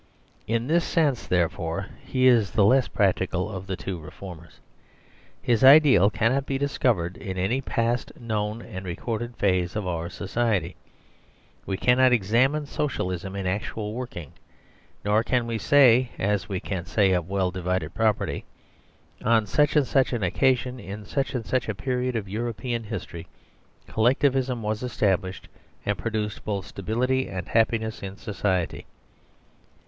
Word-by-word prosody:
In 115 Hz, +1 st, 0 dB
this 165 Hz, +5 st, +2 dB
sense, 150 Hz, -8 st, +1 dB
there 90 Hz, -2 st, +3 dB
fore, 80 Hz, 0 st, -4 dB, 0.2 s
he 130 Hz, 0 st, 0 dB
is 115 Hz, -6 st, +5 dB
the 105 Hz, -, +3 dB
less 130 Hz, +4 st, +4 dB
practical 95 Hz, -1 st, 0 dB
of 95 Hz, -2 st, -7 dB
the 95 Hz, -, -2 dB
two 90 Hz, -1 st, -5 dB
reformers. 85 Hz, +1 st, -11 dB, 0.8 s
His 120 Hz, -1 st, +2 dB
ideal 135 Hz, -, +7 dB
cannot 125 Hz, +6 st, 0 dB
be 135 Hz, -, -1 dB
discovered 120 Hz, -11 st, 0 dB
in 95 Hz, -2 st, -6 dB
any 110 Hz, +9 st, 0 dB
past, 120 Hz, -1 st, -1 dB
known, 110 Hz, -1 st, -3 dB
and 95 Hz, +1 st, -7 dB
recorded 115 Hz, +6 st, -4 dB
phase 90 Hz, -3 st, +1 dB
of 105 Hz, -2 st, -2 dB
our 85 Hz, -1 st, -3 dB
society. 95 Hz, -1 st, -1 dB, 0.9 s
We 95 Hz, -, -1 dB
cannot 125 Hz, +2 st, +4 dB
examine 125 Hz, +8 st, +2 dB
Socialism 95 Hz, -, -3 dB
in 100 Hz, -1 st, -3 dB
actual 105 Hz, +3 st, -3 dB
working, 115 Hz, -, -6 dB, 0.7 s
nor 105 Hz, +2 st, +3 dB
can 120 Hz, 0 st, +1 dB
we 115 Hz, -1 st, -3 dB
say 130 Hz, 0 st, +5 dB
(as 105 Hz, +1 st, -1 dB
we 95 Hz, -2 st, -2 dB
can 90 Hz, -3 st, -4 dB
say 95 Hz, +4 st, +3 dB
of 90 Hz, -2 st, 0 dB
well 95 Hz, -2 st, 0 dB
divided 90 Hz, 0 st, -2 dB
property): 110 Hz, -2 st, 0 dB, 0.8 s
"On 115 Hz, -1 st, +3 dB
such 150 Hz, +8 st, +2 dB
andsuch 135 Hz, -2 st, +3 dB
an 115 Hz, -4 st, -1 dB
occasion, 125 Hz, +6 st, +1 dB
in 105 Hz, +1 st, -8 dB
such 135 Hz, +2 st, -2 dB
and 115 Hz, -3 st, -3 dB
such 125 Hz, +3 st, -1 dB
a 110 Hz, -, -2 dB
period 125 Hz, +2 st, -2 dB
of 105 Hz, -3 st, -2 dB
European 115 Hz, +3 st, -3 dB
history, 90 Hz, -5 st, -6 dB, 0.6 s
Collectivism 125 Hz, +1 st, +1 dB
was 105 Hz, +1 st, -2 dB
established 95 Hz, -6 st, -1 dB, 0.4 s
and 105 Hz, -, +1 dB
produced 105 Hz, 0 st, -3 dB
both 100 Hz, -3 st, -3 dB
stability 125 Hz, +6 st, -1 dB
and 90 Hz, -2 st, -5 dB
happiness 110 Hz, -1 st, +1 dB
in 100 Hz, 0 st, -7 dB
society." 95 Hz, -5 st, -2 dB
110 Hz, 145 wpm, -25 LUFS, 95-125 Hz, 0.9 s, ideal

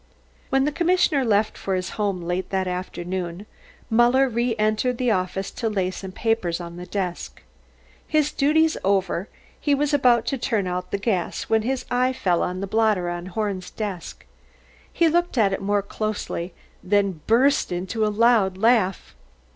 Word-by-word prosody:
When 270 Hz, 0 st, +2 dB
the 300 Hz, -, +1 dB
commissioner 340 Hz, -3 st, +2 dB
left 215 Hz, -2 st, +1 dB
for 195 Hz, -, -1 dB
his 185 Hz, -1 st, -3 dB
home 200 Hz, -4 st, -2 dB
late 180 Hz, +2 st, -2 dB
that 190 Hz, -1 st, -1 dB
afternoon, 180 Hz, 0 st, -4 dB, 0.5 s
Muller 240 Hz, +4 st, +4 dB
re 235 Hz, -1 st, 0 dB
entered 215 Hz, +4 st, +1 dB
the 250 Hz, -1 st, +1 dB
office 185 Hz, 0 st, -1 dB
to 230 Hz, -, -2 dB
lay 190 Hz, -3 st, -1 dB
some 190 Hz, 0 st, -7 dB
papers 190 Hz, -5 st, -1 dB
on 170 Hz, 0 st, -8 dB
the 180 Hz, 0 st, -8 dB
desk. 185 Hz, -4 st, -4 dB, 0.6 s
His 300 Hz, -1 st, +2 dB
duties 310 Hz, +3 st, +2 dB
over, 190 Hz, -1 st, 0 dB, 0.3 s
he 290 Hz, -1 st, +2 dB
was 295 Hz, +1 st, 0 dB
about 245 Hz, -5 st, +4 dB
to 270 Hz, -, -2 dB
turn 225 Hz, -5 st, 0 dB
out 180 Hz, 0 st, -3 dB
the -, -, -1 dB
gas, 195 Hz, -4 st, -1 dB
when 220 Hz, 0 st, +1 dB
his 260 Hz, +3 st, -2 dB
eye 250 Hz, +1 st, +2 dB
fell 180 Hz, -9 st, +1 dB
on 185 Hz, +1 st, -2 dB
the -, -, -1 dB
blotter 210 Hz, -4 st, +1 dB
on 175 Hz, +1 st, -5 dB
Horn's 195 Hz, -1 st, -3 dB
desk. 200 Hz, -6 st, -6 dB, 0.7 s
He 335 Hz, -, +3 dB
looked 345 Hz, -2 st, +1 dB
at 200 Hz, -4 st, +3 dB
it -, -, -3 dB
more 205 Hz, 0 st, +1 dB
closely, 200 Hz, -4 st, -4 dB, 0.3 s
then 195 Hz, -4 st, +1 dB
burst 255 Hz, +3 st, +3 dB
into 185 Hz, +5 st, -2 dB
a 215 Hz, -, +2 dB
loud 210 Hz, -3 st, +3 dB
laugh. 215 Hz, -3 st, +2 dB
210 Hz, 170 wpm, -23 LUFS, 185-245 Hz, 0.7 s, Muller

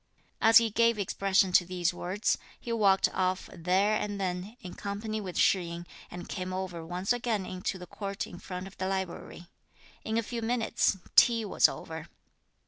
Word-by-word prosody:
As 225 Hz, 0 st, +8 dB
he 230 Hz, -1 st, +4 dB
gave 230 Hz, +1 st, +3 dB
expression 195 Hz, -1 st, +2 dB
to 180 Hz, -, +6 dB
these 175 Hz, 0 st, -1 dB
words, 185 Hz, +5 st, 0 dB, 0.2 s
he 235 Hz, -, -4 dB
walked 200 Hz, -4 st, +4 dB
off 185 Hz, 0 st, 0 dB
there 185 Hz, +5 st, +2 dB
and 205 Hz, -1 st, -3 dB
then, 190 Hz, +4 st, -3 dB
in 180 Hz, -, -8 dB
company 215 Hz, +2 st, -4 dB
with 185 Hz, -3 st, -6 dB
Shih 190 Hz, -, +4 dB
yin, 170 Hz, 0 st, -7 dB, 0.2 s
and 175 Hz, 0 st, -8 dB
came 185 Hz, 0 st, -4 dB
over 185 Hz, -3 st, -4 dB
once 180 Hz, +6 st, -1 dB
again 230 Hz, -5 st, -1 dB
into 185 Hz, +1 st, -3 dB
the 180 Hz, -, -9 dB
court 200 Hz, +2 st, -5 dB
in 175 Hz, -, -10 dB
front 180 Hz, 0 st, -6 dB
of 195 Hz, -, -11 dB
the 185 Hz, -, -1 dB
library. 190 Hz, -2 st, -4 dB, 0.6 s
In 220 Hz, 0 st, -1 dB
a 230 Hz, -, +1 dB
few 235 Hz, +2 st, -4 dB
minutes, 230 Hz, -3 st, +1 dB, 0.2 s
tea 230 Hz, -2 st, +6 dB
was -, -, +4 dB
over. -, -, -7 dB
195 Hz, 180 wpm, -29 LUFS, 180-215 Hz, 0.6 s, As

